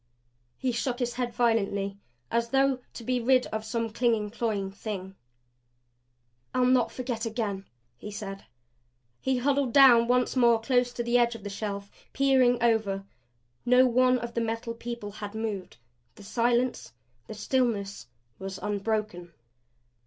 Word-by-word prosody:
He 260 - -1
shook 245 +1 -2
his 245 -2 -2
head 245 -1 -2
violently 200 -4 0 0.3
as 235 0 0
though 270 0 +2 0.2
to 235 - -7
be 250 +1 0
rid 255 +1 +3
of 220 0 -2
some 225 0 -2
clinging, 225 -3 +1
cloying 210 -4 -2
thing. 195 -2 -6 1.4
"I'll 255 0 +3
not 255 -1 +3
forget 245 -3 -3
again," 210 -4 -3 0.3
he 210 - -8
said. 200 -1 -7 0.7
He 265 -1 0
huddled 270 -1 +1
down 245 -4 +7
once 250 +1 +2
more 235 -3 +5
close 245 +1 +1
to 240 - -3
the 240 +1 +3
edge 235 -1 +2
of 220 - -10
the 205 - -5
shelf; 200 -1 -5 0.2
peering 260 -3 +4
over. 215 -4 +1 0.6
No 250 +1 +5
one 255 +1 +4
of 235 -1 -6
the 235 - -1
Metal 230 +1 -3
People 230 -2 -6
had 205 0 -8
moved; 210 - -4 0.4
the 205 - -13
silence, 240 - 0 0.3
the 220 - -7
stillness, 210 - -1 0.3
was 190 0 -6
unbroken. 205 -4 -3
230 Hz, 145 wpm, -28 LUFS, 210-245 Hz, 1.4 s, down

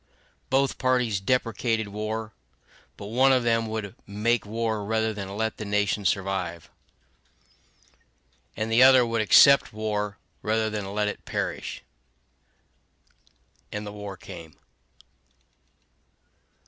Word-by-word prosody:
Both 135 +1 +1
parties 125 -5 +1
deprecated 115 0 0
war; 110 +2 -4 0.6
but - - -8
one 135 +2 +5
of 130 -2 +3
them 115 -1 +1
would 110 -3 -4
make 105 +3 0
war 110 -1 -2
rather 110 +1 0
than 100 -1 -6
let 110 0 -1
the - - -5
nation 105 0 0
survive; 95 -3 -2 1.9
and 110 +1 -2
the 115 +2 +5
other 130 -1 +7
would 115 -1 0
accept 140 +6 +6
war 105 -1 -3 0.2
rather 110 0 0
than 105 -2 -4
let 105 +1 0
it 105 - -5
perish. - - -4 1.9
And 105 0 -5
the 105 - -7
war 100 -2 -7
came. 85 -4 -11
110 Hz, 115 wpm, -26 LUFS, 100-115 Hz, 1.9 s, other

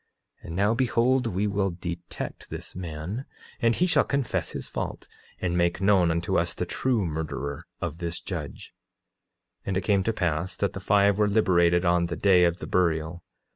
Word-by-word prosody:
9:17 - - -12
And 80 - -5
now 100 +4 +3
behold, 125 +1 +2
we 100 0 -1
will 100 -1 +1
detect 85 -1 -6
this - - -7
man, 90 - -5 0.4
and 115 -1 +3
he 180 - +2
shall 175 - +4
confess 140 -3 -1
his - - -5
fault - - -5 0.3
and 90 -1 -1
make 85 0 +1
known 95 -3 +4
unto 85 +3 +1
us 85 0 -1
the 90 - -2
true 115 +2 0
murderer 75 -3 -4
of 80 - -4
this 85 0 -4
judge. - - -7 0.9
9:18 - - -58
And 95 -1 0
it - - +1
came 100 +1 +2
to 115 - 0
pass 90 -3 -1
that 100 - 0
the - - -5
five 100 +1 +3
were 105 - +4
liberated 90 -4 +3
on 85 0 +3
the 85 - -3
day 90 -3 +5
of 85 0 +1
the - - -7
burial. 85 -1 0
90 Hz, 190 wpm, -26 LUFS, 85-105 Hz, 0.9 s, day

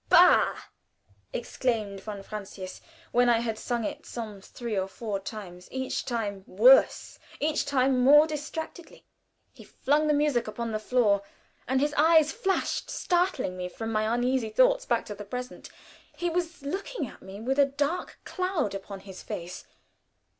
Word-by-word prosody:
"Bah!" - - +6 0.8
exclaimed 220 -5 -2
von 205 -1 -7
Francius, 195 -3 -8 0.3
when 245 0 +4
I 235 - +5
had 225 -2 -3
sung 240 0 -2
it - - -4
some 215 -4 -7
three 235 +2 -5
or 190 -1 0
four 205 0 -4
times, 190 -3 -8
each 260 0 -3
time 205 -5 -3
worse, 245 +8 +5 0.2
each 305 +1 0
time 265 -2 +2
more 295 +4 +8
distractedly. 320 +2 -6 0.5
He - - -14
flung 295 +3 +1
the 300 - +3
music 290 -6 +1
upon 230 +1 -4
the 215 - -1
floor, 215 -3 +2 0.5
and 260 +2 +2
his 295 +2 +1
eyes 315 0 +5
flashed, 390 -1 -1
startling 350 - 0
me 180 0 -4
from 225 +4 -5
my 215 0 +1
uneasy 245 -1 +1
thoughts - - +3
back - - +1
to 210 - -6
the 205 0 -8
present. 250 +4 -7 0.5
He 350 -1 -1
was 345 -2 -3
looking 390 - -3
at - - -12
me 190 +1 -9
with 265 +5 -1
a 280 - +7
dark 285 +5 -2
cloud 365 - -1
upon 195 0 -7
his 190 -1 -10
face. 175 +1 -7
245 Hz, 160 wpm, -28 LUFS, 210-295 Hz, 0.8 s, more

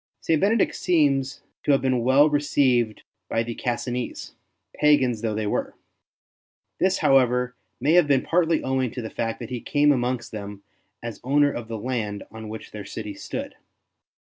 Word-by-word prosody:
St. 160 -2 +1
Benedict 210 +2 +2
seems 140 -6 +1 0.2
to 145 - +2
have 135 - +3
been 130 -2 +1
well 135 +4 +5
re 145 -1 +2
ceived 125 -6 +1 0.3
by 115 - +1
the 115 0 -5
Cassinese, 120 +1 -4 0.4
pagans 130 -7 +3
though 110 -2 -1
they 110 0 -2
were. 105 - -2 1.0
This, 190 +1 +2
however, 125 -2 +3 0.2
may 140 +5 +2
have 175 -3 +5
been 140 -2 +3
partly 165 -2 +1
owing 130 -1 0
to 125 - -4
the 110 - -6
fact 115 -1 -2
that - - -8
he 125 -2 -4
came 145 0 +3
amongst 125 -3 -1
them 100 -2 -7 0.4
as 115 -2 -6
owner 145 +2 +3
of 120 -4 -6
the 115 0 -4
land 105 -3 -3
on 110 -1 -8
which 110 0 -8
their 105 -1 -7
city 105 +1 -6
stood. - - -6
125 Hz, 170 wpm, -24 LUFS, 115-145 Hz, 1.0 s, well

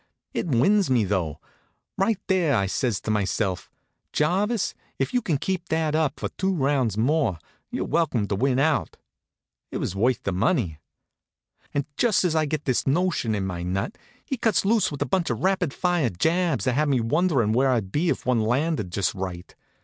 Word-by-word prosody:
It - - -2
wins 170 - +3
me, 125 -4 +3
though. 90 -7 -1 0.6
Right 205 +2 +1
there 180 -7 +2
I 100 - +2
says 110 +2 -1
to 110 - -2
myself: 100 -2 -1 0.4
"Jarvis, 195 +8 +1 0.2
if - - -1
you 250 - +2
can 165 -9 0
keep 180 +3 -3
that 160 -1 0
up 155 -2 0
for - - -2
two 190 0 +1
rounds 135 - +1
more, 135 - +2 0.3
you're - - -3
welcome 130 -11 +1
to 100 - -1
win 130 +4 +1
out." 150 +2 +1 0.7
It - - -4
was 95 - -3
worth 120 +4 +1
the 100 - -1
money. 95 - 0 0.9
And 145 -2 -1
just 235 -6 +3
as 170 -3 +1
I 155 -1 +2
gets 150 +1 -2
this 130 -1 0
notion 145 -7 +1
in 100 -2 -2
my 90 -2 -4
nut, 95 - -2 0.3
he 270 - -3
cuts 220 -4 +1
loose 215 -2 +3
with 145 -1 -2
a - - -6
bunch 175 +5 0
of - - -2
rapid 190 -5 +1
fire 175 -5 +1
jabs 165 - 0
that 130 - +2
had 150 +3 +1
me 135 -3 +3
wonderin' 125 - +2
where 130 +3 +3
I'd 110 -7 0
be 165 - +1
if - - -2
one 125 -2 +2
landed 120 - 0
just 100 +1 0
right. 90 -2 -6
140 Hz, 190 wpm, -25 LUFS, 110-175 Hz, 0.9 s, wins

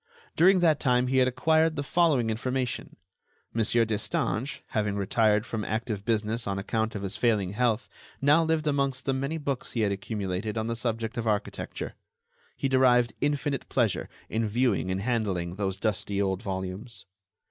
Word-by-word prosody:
During 185 +2 +5
that 160 -4 +4
time 125 -2 +2
he 130 - +2
had 130 - +4
acquired 160 +5 +2
the 145 - -2
following 140 -8 +2
information: 125 +2 -2 0.6
Mon. 115 - +1 0.2
Destange, 110 +4 -1
having 105 -2 0
retired 105 +2 +2
from 110 -3 -3
active 110 -2 -3
business 110 +1 0
on 100 -1 -1
account 110 +3 -1
of 100 - -4
his 95 - -3
failing 105 -6 +1
health, 120 0 +1 0.3
now 150 +4 +5
lived 160 -1 0
amongst 140 -3 0
the 135 - +1
many 140 +4 -2
books 140 -4 -3
he 115 - 0
had 105 -2 +2
accumulated 100 +1 -3
on 110 - -1
the 115 0 -2
subject 115 0 -2
of 115 -1 -2
architecture. 105 -2 -2 0.6
He - - 0
derived 125 -3 +4
infinite 145 -1 -1
pleasure 115 -6 0 0.2
in 110 0 -1
viewing 115 -3 +1
and 95 +1 -1
handling 100 -7 -1
those 95 -2 -1
dusty 100 -1 -1
old 95 -2 0
volumes. 95 +4 -5
115 Hz, 165 wpm, -27 LUFS, 105-130 Hz, 0.6 s, During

